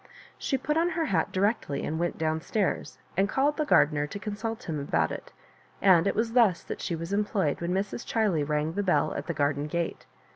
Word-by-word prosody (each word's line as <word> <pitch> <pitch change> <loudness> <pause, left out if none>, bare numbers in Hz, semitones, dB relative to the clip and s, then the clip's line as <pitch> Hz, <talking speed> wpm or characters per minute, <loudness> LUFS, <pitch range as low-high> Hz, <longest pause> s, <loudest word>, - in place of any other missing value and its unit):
She 270 - 0
put 300 +3 -1
on 335 +2 +3
her 325 - +1
hat 170 - 0
directly 190 -7 0
and 160 +1 -2
went 175 0 -1
down 160 0 0
stairs, 205 +2 -1 0.2
and 195 +2 +2
called 285 +4 +2
the 305 - 0
gardener 150 - +3
to 150 - -6
consult 215 +2 -4
him 155 -3 -3
about 140 - 0
it; - - -7 0.5
and 185 -2 +5
it - - +1
was 225 +1 0
thus 225 -8 +4
that - - -6
she 170 - -2
was 165 +4 -5
em 205 +1 +3
ployed 190 -9 -1
when 170 +1 -1
Mrs. 195 +5 -2
Chiley 205 -9 +2
rang 150 +2 -1
the 200 - -1
bell 185 -3 +2
at - - -5
the 170 - -1
gardengate. 145 +4 -1
185 Hz, 215 wpm, -28 LUFS, 160-220 Hz, 0.5 s, and